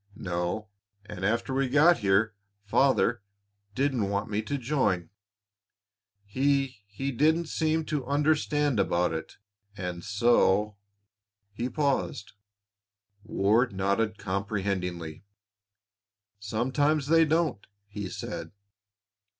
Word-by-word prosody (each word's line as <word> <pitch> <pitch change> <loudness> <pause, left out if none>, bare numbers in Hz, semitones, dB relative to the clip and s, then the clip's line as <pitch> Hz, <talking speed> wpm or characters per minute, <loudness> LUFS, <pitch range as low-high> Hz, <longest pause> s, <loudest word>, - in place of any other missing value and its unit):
"No; 90 +4 -3 0.4
and 105 -3 -8
after 115 +6 0
we 135 -1 +1
got 155 +6 +5
here 105 +2 +2 0.3
Father 120 +1 +2 0.5
didn't 130 -6 0
want 100 +2 -2
me 105 +1 0
to 140 +6 -3
join. 115 - 0 1.1
He 135 0 0
he 135 +8 -4
didn't 160 +6 +2
seem 160 0 0
to 145 -5 -3
understand 145 -2 +1
about 90 -3 +1
it, 80 0 -6 0.4
and 90 -2 -5
so 105 -1 +2 0.4
" 100 -1 -52
He 120 +4 -3
paused; 140 -6 -1 0.9
Ward 110 +2 +2
nodded 100 +3 0
comprehendingly. 95 -5 -3 1.2
"Sometimes 130 +8 0
they 165 +3 +5
don't," 160 -7 0 0.2
he 105 -2 -6
said. - - -6
110 Hz, 100 wpm, -28 LUFS, 100-140 Hz, 1.2 s, got